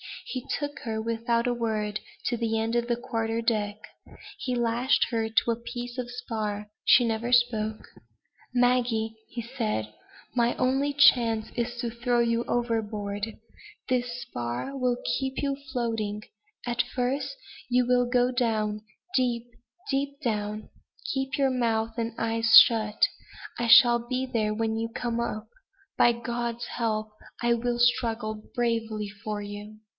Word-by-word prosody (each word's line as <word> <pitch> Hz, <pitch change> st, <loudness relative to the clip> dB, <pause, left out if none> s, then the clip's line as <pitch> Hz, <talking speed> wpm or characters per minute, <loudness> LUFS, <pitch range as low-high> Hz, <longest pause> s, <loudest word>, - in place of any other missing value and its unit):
He 255 Hz, -1 st, -5 dB
took 290 Hz, -1 st, -4 dB
her, 220 Hz, -2 st, -3 dB
without 230 Hz, +1 st, 0 dB
a 245 Hz, -, +1 dB
word, 215 Hz, -3 st, -1 dB, 0.3 s
to 240 Hz, -, 0 dB
the 225 Hz, -1 st, 0 dB
end 225 Hz, +1 st, -1 dB
of 240 Hz, 0 st, +1 dB
the 240 Hz, -, +1 dB
quarter 230 Hz, -2 st, -2 dB
deck. 215 Hz, -3 st, 0 dB, 0.6 s
He 250 Hz, -2 st, -2 dB
lashed 240 Hz, +2 st, +2 dB
her 225 Hz, -1 st, 0 dB
to 225 Hz, +1 st, +2 dB
a -, -, +1 dB
piece 240 Hz, +1 st, -7 dB
of 245 Hz, -1 st, -3 dB
spar. 215 Hz, -4 st, -4 dB
She 245 Hz, -, +6 dB
never 230 Hz, +1 st, -1 dB
spoke: 220 Hz, -3 st, +2 dB, 0.6 s
"Maggie," 245 Hz, -3 st, +2 dB, 0.2 s
he 235 Hz, -, -5 dB
said, 220 Hz, -, -3 dB, 0.4 s
"my 240 Hz, -1 st, +2 dB
only 270 Hz, +3 st, +1 dB
chance 235 Hz, -6 st, +5 dB
is 240 Hz, 0 st, -2 dB
to 235 Hz, -2 st, -2 dB
throw 240 Hz, +1 st, 0 dB
you 235 Hz, 0 st, +1 dB
overboard. 215 Hz, -3 st, -2 dB, 0.5 s
This 245 Hz, -1 st, -1 dB
spar 120 Hz, -, -4 dB
will 250 Hz, -2 st, +1 dB, 0.2 s
keep 265 Hz, 0 st, -3 dB
you 280 Hz, -1 st, 0 dB, 0.2 s
floating. 225 Hz, -4 st, -2 dB, 0.4 s
At 240 Hz, -1 st, +1 dB
first, 255 Hz, -, -2 dB, 0.3 s
you 250 Hz, 0 st, +3 dB
will 245 Hz, 0 st, +3 dB
go 245 Hz, 0 st, +3 dB
down 215 Hz, -4 st, 0 dB, 0.3 s
deep, 245 Hz, -2 st, +1 dB, 0.4 s
deep 280 Hz, +1 st, -1 dB
down. 210 Hz, -2 st, -2 dB, 0.4 s
Keep 270 Hz, 0 st, -2 dB
your 270 Hz, -2 st, +3 dB
mouth 225 Hz, -3 st, 0 dB
and 230 Hz, -1 st, -2 dB
eyes 225 Hz, 0 st, +7 dB
shut. 215 Hz, -2 st, -1 dB, 0.6 s
I 240 Hz, -, 0 dB
shall 240 Hz, 0 st, +8 dB
be 255 Hz, +1 st, -1 dB
there 220 Hz, -4 st, 0 dB
when 220 Hz, 0 st, -1 dB
you 230 Hz, 0 st, -2 dB
come 235 Hz, 0 st, -3 dB
up. 230 Hz, -2 st, -3 dB, 0.5 s
By 240 Hz, -, +6 dB
God's 235 Hz, 0 st, -3 dB
help, 215 Hz, -2 st, -1 dB, 0.3 s
I 235 Hz, 0 st, +4 dB
will 240 Hz, +1 st, -1 dB
struggle 230 Hz, -3 st, +1 dB
bravely 225 Hz, -3 st, -1 dB
for 210 Hz, +1 st, -5 dB
you." 205 Hz, +1 st, -8 dB
235 Hz, 145 wpm, -27 LUFS, 220-245 Hz, 0.6 s, shall